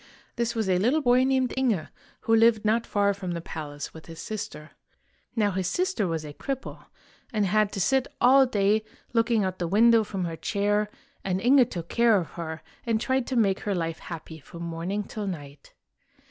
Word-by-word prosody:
This 235 Hz, -1 st, -1 dB
was 220 Hz, -3 st, 0 dB
a 185 Hz, -1 st, +2 dB
little 265 Hz, +10 st, +2 dB
boy 250 Hz, 0 st, +5 dB
named 260 Hz, -2 st, +1 dB
Inge, 240 Hz, -11 st, 0 dB, 0.3 s
who 225 Hz, -, +3 dB
lived 225 Hz, -1 st, +4 dB
not 225 Hz, +2 st, +2 dB
far 200 Hz, -1 st, +2 dB
from 190 Hz, -3 st, -5 dB
the 170 Hz, -, -3 dB
palace 145 Hz, -3 st, -7 dB
with 160 Hz, -, -12 dB
his 165 Hz, -1 st, -10 dB
sister. 215 Hz, -8 st, -6 dB, 0.6 s
Now 210 Hz, -3 st, +2 dB
his 185 Hz, -1 st, -1 dB
sister 365 Hz, -, 0 dB
was 165 Hz, -2 st, -3 dB
a 145 Hz, -, -8 dB
cripple, 270 Hz, -, -6 dB, 0.5 s
and 210 Hz, -3 st, +1 dB
had 210 Hz, +2 st, +2 dB
to 200 Hz, -, -3 dB
sit 265 Hz, +7 st, +2 dB
all 265 Hz, +2 st, +6 dB
day 210 Hz, -1 st, +2 dB, 0.3 s
looking 230 Hz, -2 st, +2 dB
out 185 Hz, -1 st, -1 dB
of -, -, -29 dB
the 175 Hz, -, -1 dB
window 225 Hz, +4 st, +5 dB
from 195 Hz, -3 st, -3 dB
her 165 Hz, -1 st, -4 dB
chair; 205 Hz, +4 st, 0 dB, 0.3 s
and 185 Hz, -1 st, -1 dB
Inge 250 Hz, +2 st, +5 dB
took 170 Hz, -3 st, -5 dB
care 235 Hz, -2 st, +4 dB
of 170 Hz, -6 st, -3 dB
her, 160 Hz, -1 st, -6 dB, 0.2 s
and 225 Hz, -2 st, 0 dB
tried 260 Hz, +1 st, 0 dB
to 260 Hz, -, -2 dB
make 200 Hz, -5 st, +2 dB
her 205 Hz, -2 st, -2 dB
life 165 Hz, -2 st, -2 dB
happy 160 Hz, -1 st, -8 dB
from 170 Hz, +4 st, -10 dB
morning 170 Hz, +5 st, -3 dB
till 210 Hz, 0 st, -5 dB
night. 145 Hz, -6 st, -8 dB
205 Hz, 200 wpm, -26 LUFS, 175-235 Hz, 0.6 s, all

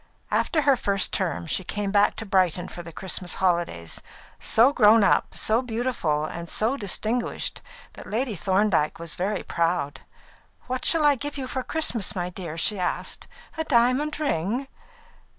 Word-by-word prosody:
After 310 Hz, -3 st, +1 dB
her 280 Hz, -1 st, +5 dB
first 200 Hz, -5 st, 0 dB
term, 175 Hz, -3 st, -1 dB
she 175 Hz, +4 st, -2 dB
came 205 Hz, +2 st, -3 dB
back 205 Hz, 0 st, +3 dB
to 225 Hz, -, -6 dB
Brighton 185 Hz, -3 st, +1 dB
for 175 Hz, -, -8 dB
the 170 Hz, -1 st, -10 dB
Christmas 180 Hz, +1 st, -2 dB
holidays, 170 Hz, -, -1 dB, 0.4 s
so 240 Hz, +6 st, +4 dB
grown 215 Hz, -2 st, +6 dB
up, -, -, +2 dB
so 225 Hz, +3 st, +2 dB
beautiful, 225 Hz, -11 st, -1 dB
and 170 Hz, +1 st, -7 dB
so 225 Hz, +5 st, +1 dB
distinguished 225 Hz, +2 st, -2 dB, 0.3 s
that -, -, -11 dB
Lady 230 Hz, +2 st, -1 dB
Thorndyke 190 Hz, -4 st, +1 dB
was 165 Hz, -2 st, -6 dB
very 195 Hz, +6 st, -2 dB
proud. 165 Hz, -4 st, -1 dB, 0.6 s
"What 255 Hz, 0 st, -3 dB
shall 325 Hz, -3 st, +5 dB
I 290 Hz, -, +6 dB
give 290 Hz, +2 st, -5 dB
you 265 Hz, -, -3 dB
for 260 Hz, 0 st, -3 dB
Christmas, 250 Hz, -, -1 dB
my 180 Hz, -1 st, -3 dB
dear?" 170 Hz, -3 st, -7 dB
she 200 Hz, +4 st, +2 dB
asked. 180 Hz, -, -3 dB, 0.3 s
"A -, -, +1 dB
diamond 270 Hz, +2 st, +2 dB
ring?" 245 Hz, -, -1 dB
205 Hz, 160 wpm, -25 LUFS, 175-250 Hz, 0.6 s, grown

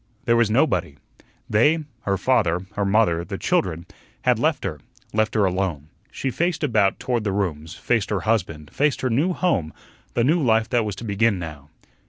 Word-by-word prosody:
There 115 Hz, -, +3 dB
was 115 Hz, -2 st, +3 dB
nobody. 90 Hz, -, +1 dB, 0.5 s
They 150 Hz, +10 st, +3 dB, 0.2 s
her 100 Hz, -1 st, +1 dB
father, 95 Hz, -6 st, +1 dB
her 100 Hz, -, -1 dB
mother, 100 Hz, -5 st, +2 dB
the -, -, -6 dB
children 85 Hz, +2 st, 0 dB, 0.4 s
had -, -, +3 dB
left -, -, +1 dB
her, -, -, -4 dB, 0.3 s
left 110 Hz, +1 st, +1 dB
her 105 Hz, -2 st, +3 dB
alone. 90 Hz, -6 st, -2 dB, 0.2 s
She 135 Hz, -, -3 dB
faced 170 Hz, +3 st, -1 dB
about 110 Hz, -8 st, +2 dB
toward 120 Hz, -3 st, -1 dB
the 100 Hz, -, -1 dB
rooms 85 Hz, -5 st, -3 dB
faced 115 Hz, 0 st, 0 dB
her 100 Hz, -4 st, -1 dB
husband, 85 Hz, -8 st, -1 dB
faced 145 Hz, -1 st, +1 dB
her 130 Hz, -, 0 dB
new 150 Hz, +11 st, +2 dB
home, 100 Hz, -, 0 dB, 0.4 s
the 120 Hz, -, +2 dB
new 160 Hz, +7 st, +3 dB
life 115 Hz, -4 st, +3 dB
that 120 Hz, -3 st, +2 dB
was 105 Hz, -2 st, -3 dB
to 100 Hz, -, -9 dB
begin 105 Hz, 0 st, +1 dB
now. 75 Hz, -4 st, -8 dB
105 Hz, 185 wpm, -23 LUFS, 90-120 Hz, 0.5 s, There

